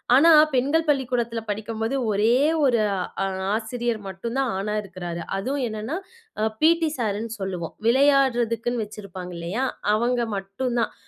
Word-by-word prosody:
ஆனா 330 +5 +7 0.2
பெண்கள் 295 +6 +2
பள்ளிக்கூடத்துல 245 -4 0
படிக்கும்போது 225 +3 -2 0.2
ஒரே 215 +4 +3 0.3
1 240 -3 +3 0.5
அ - - 0 0.3
ஆசிரியர் 230 0 -2
மட்டும் 230 +7 -5
தான் 265 -3 +1
ஆணா 210 +2 -2
இருக்குறாரு. 175 -3 -6 0.2
அதுவும் 260 +6 -1
என்னன்னா, 220 +8 -4 0.6
பீ.டி 325 0 +4
சார்னு 220 -1 -2
சொல்லுவோம். 180 -4 -4
விளையாடுறதுக்குன்னு 245 -3 +3
வச்சிருப்பாங்க 190 -4 -8
இல்லையா! 190 +11 -2 0.3
அவங்க 240 +2 +1 0.2
மட்டும்தான். 230 +5 -2
230 Hz, 120 wpm, -24 LUFS, 205-260 Hz, 0.6 s, ஆனா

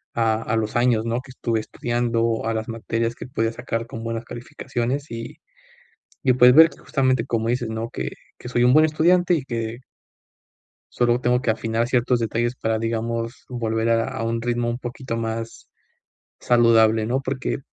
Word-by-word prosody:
a 115 -1 +1
a 115 - -1
los 110 -1 -2
años, 120 -2 +2
¿no?, 115 +2 -1
que 135 - -17
estuve 115 -3 -1
estudiando, 115 0 -1
a 115 - 0
las 110 0 -3
materias 115 0 -2
que - - -8
pude 115 -2 -1
sacar 115 0 -3
con 115 0 -7
buenas 115 0 -4
calificaciones, 125 +2 -4
y, 115 0 -7 0.9
y, 130 - +5
pues, 125 0 +7
ver 160 +2 +8
que - - -17
justamente 130 -3 +1
como 115 -2 -1
dices, 120 -1 -1
¿no?, 110 +1 -4
que 65 0 -4 0.3
que 125 - -9
soy 120 0 +2
un 125 - +5
buen 155 +1 +7
estudiante, 175 +3 +3
y 145 - -2
que 115 -2 -4 1.2
Solo 120 +1 +2
tengo 125 0 +2
que 125 - 0
afinar 115 +1 -1
ciertos 125 0 +2
detalles 120 +2 -1
para, 110 -3 -1
digamos, 115 +1 -3
volver 115 -2 -1
a 115 +1 +2
a 130 -3 -4
un 115 0 -1
ritmo 120 0 -1
un 120 - -1
poquito 120 -1 -5
más 115 0 -4 0.7
saludable, 115 -2 +4
¿no? 125 +5 0
Porque 135 0 -3
115 Hz, 180 wpm, -23 LUFS, 115-125 Hz, 1.2 s, ver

